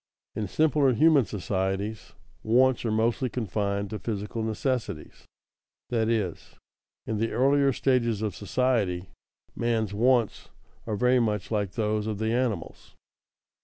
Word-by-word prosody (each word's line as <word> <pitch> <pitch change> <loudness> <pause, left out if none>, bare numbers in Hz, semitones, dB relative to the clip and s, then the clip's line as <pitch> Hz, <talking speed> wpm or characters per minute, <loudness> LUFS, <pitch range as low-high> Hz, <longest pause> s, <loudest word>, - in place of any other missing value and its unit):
_In 105 -3 -3
simpler 145 -2 +3
human 150 -2 +5
societies, 95 +1 -3 0.3
wants 125 +3 +3
are 115 - 0
mostly 115 +4 +1
confined 100 -3 -2
to 110 - -4
physical 105 0 -4
necessities; 110 - -3 0.7
that 115 -2 +1
is, 105 -7 -2 0.5
in 110 - -2
the 115 +1 0
earlier 135 +3 +3
stages 120 -5 +1
of 105 -5 -2
society, 100 -4 0 0.4
man's 110 -3 0
wants 120 0 +1 0.4
are 110 - -1
very 125 +4 +3
much 105 -4 -1
like 100 -4 -1
those 105 -1 -1
of 110 -2 -2
the 110 +2 -1
animals. 120 -8 -3
110 Hz, 130 wpm, -27 LUFS, 105-125 Hz, 0.7 s, human